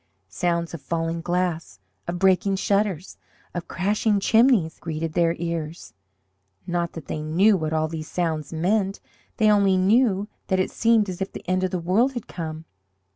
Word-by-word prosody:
Sounds 170 Hz, -, -1 dB
of 165 Hz, -, -6 dB
falling 165 Hz, 0 st, -2 dB
glass, 175 Hz, -, -2 dB, 0.3 s
of 175 Hz, +1 st, -2 dB
breaking 190 Hz, +2 st, +3 dB
shutters, 195 Hz, -3 st, -1 dB, 0.4 s
of 175 Hz, -1 st, -5 dB
crashing 205 Hz, +2 st, +1 dB
chimneys 220 Hz, -6 st, +3 dB
greeted 160 Hz, -1 st, -4 dB
their 170 Hz, 0 st, +2 dB
ears 165 Hz, -1 st, -5 dB, 0.7 s
not 175 Hz, -1 st, -2 dB
that 165 Hz, -4 st, -8 dB
they 150 Hz, -, -4 dB
knew 180 Hz, +8 st, +3 dB
what 160 Hz, -4 st, -2 dB
all 155 Hz, 0 st, +1 dB
these 155 Hz, -1 st, -6 dB
sounds 160 Hz, -4 st, -2 dB
meant. 195 Hz, +4 st, 0 dB, 0.4 s
They 215 Hz, -1 st, +4 dB
only 200 Hz, -2 st, +4 dB
knew 205 Hz, +1 st, +3 dB, 0.2 s
that 190 Hz, -1 st, +1 dB
it 185 Hz, -, 0 dB
seemed 225 Hz, -2 st, +3 dB
as 185 Hz, 0 st, -6 dB
if 190 Hz, -, -2 dB
the -, -, -10 dB
end 185 Hz, +1 st, +1 dB
of 185 Hz, -, +1 dB
the 180 Hz, -, -2 dB
world 195 Hz, +10 st, +2 dB
had 240 Hz, -4 st, -5 dB
come. 160 Hz, -2 st, -6 dB
180 Hz, 170 wpm, -24 LUFS, 165-200 Hz, 0.7 s, They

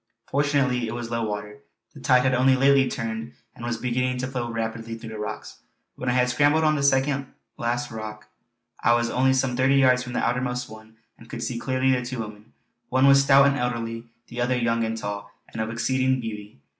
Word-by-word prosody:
Fortunately 140 Hz, -4 st, +1 dB
it 110 Hz, -, -4 dB
was 120 Hz, -1 st, -5 dB
low 115 Hz, -1 st, -1 dB
water. 105 Hz, -1 st, -5 dB, 0.3 s
The -, -, -12 dB
tide 125 Hz, 0 st, +4 dB
had 130 Hz, 0 st, +2 dB
only 130 Hz, +1 st, +4 dB
lately 135 Hz, 0 st, +4 dB
turned 115 Hz, 0 st, -4 dB, 0.2 s
and 120 Hz, -, -12 dB
was 120 Hz, -1 st, -2 dB
beginning 125 Hz, +1 st, -1 dB
to 125 Hz, +1 st, -2 dB
flow 125 Hz, -3 st, -3 dB
rapidly 115 Hz, 0 st, -4 dB
through 115 Hz, 0 st, -9 dB
the 110 Hz, -, -7 dB
rocks. 105 Hz, -, -6 dB, 0.3 s
When 125 Hz, -, -4 dB
I -, -, +2 dB
had 125 Hz, 0 st, +3 dB
scrambled 145 Hz, +5 st, +3 dB
on 155 Hz, -1 st, +3 dB
the 145 Hz, -, -1 dB
second 135 Hz, 0 st, +2 dB, 0.3 s
last 120 Hz, +1 st, -2 dB
rock 105 Hz, -1 st, -7 dB, 0.5 s
I 120 Hz, -, +4 dB
was 120 Hz, 0 st, 0 dB
only 130 Hz, +1 st, +3 dB
some 130 Hz, -1 st, 0 dB
thirty 130 Hz, +2 st, +3 dB
yards 130 Hz, -2 st, +4 dB
from 125 Hz, -1 st, -7 dB
the -, -, 0 dB
outermost 125 Hz, 0 st, -1 dB
one 110 Hz, 0 st, -14 dB, 0.2 s
and 115 Hz, -, -15 dB
could 120 Hz, -, -5 dB
see 120 Hz, -2 st, -3 dB
clearly 130 Hz, +1 st, +1 dB
the 125 Hz, -1 st, +1 dB
two 125 Hz, +1 st, -5 dB
women. 105 Hz, +1 st, -8 dB, 0.4 s
One 130 Hz, +1 st, +3 dB
was 140 Hz, 0 st, +7 dB
stout 140 Hz, 0 st, +6 dB
and 140 Hz, 0 st, +2 dB
elderly, 115 Hz, -1 st, -3 dB, 0.2 s
the 120 Hz, 0 st, -6 dB
other 125 Hz, +1 st, +1 dB
young 115 Hz, -1 st, +1 dB
and 115 Hz, 0 st, -2 dB
tall 100 Hz, -1 st, -5 dB, 0.2 s
and 110 Hz, -, -3 dB
of 110 Hz, -, -2 dB
exceeding 130 Hz, +3 st, 0 dB
beauty. 105 Hz, -, -7 dB
125 Hz, 215 wpm, -24 LUFS, 115-130 Hz, 0.5 s, was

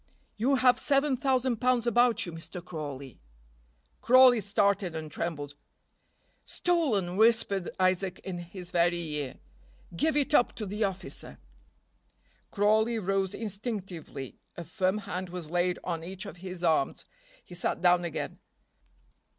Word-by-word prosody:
"You 255 Hz, +6 st, +2 dB
have 250 Hz, -1 st, +4 dB
seven 275 Hz, -1 st, +2 dB
thousand 260 Hz, -2 st, +1 dB
pounds 250 Hz, 0 st, +2 dB
about 240 Hz, -1 st, +3 dB
you, 175 Hz, -, -6 dB
Mr. 170 Hz, +2 st, -8 dB
Crawley." 140 Hz, -6 st, -7 dB, 0.8 s
Crawley 250 Hz, -1 st, +7 dB
started 200 Hz, -3 st, +1 dB
and 155 Hz, -1 st, -5 dB
trembled. 145 Hz, -4 st, -4 dB, 0.9 s
"Stolen!" 230 Hz, -, 0 dB
whispered 220 Hz, -4 st, +3 dB
Isaac 185 Hz, 0 st, +1 dB
in 180 Hz, -2 st, -5 dB
his 175 Hz, +1 st, -9 dB
very 175 Hz, 0 st, +2 dB
ear. 150 Hz, -5 st, -4 dB, 0.6 s
"Give 305 Hz, -, +1 dB
it 290 Hz, +1 st, +1 dB
up 245 Hz, -, +4 dB
to 215 Hz, -, -4 dB
the 205 Hz, +3 st, -2 dB
officer." 195 Hz, -2 st, -4 dB, 1.1 s
Crawley 220 Hz, +3 st, +2 dB
rose 195 Hz, -1 st, 0 dB
instinctively. 195 Hz, -, -6 dB, 0.2 s
A 170 Hz, -, -5 dB
firm 185 Hz, +3 st, 0 dB
hand 185 Hz, -3 st, -5 dB
was 170 Hz, -3 st, -7 dB
laid 175 Hz, 0 st, +1 dB
on 165 Hz, -2 st, -3 dB
each 185 Hz, +3 st, -6 dB
of 200 Hz, -, -9 dB
his 180 Hz, 0 st, -7 dB
arms; 160 Hz, -5 st, +1 dB, 0.4 s
he -, -, -12 dB
sat 175 Hz, -, -1 dB
down 175 Hz, 0 st, +5 dB
again. 170 Hz, -3 st, -4 dB
190 Hz, 135 wpm, -29 LUFS, 175-230 Hz, 1.1 s, Crawley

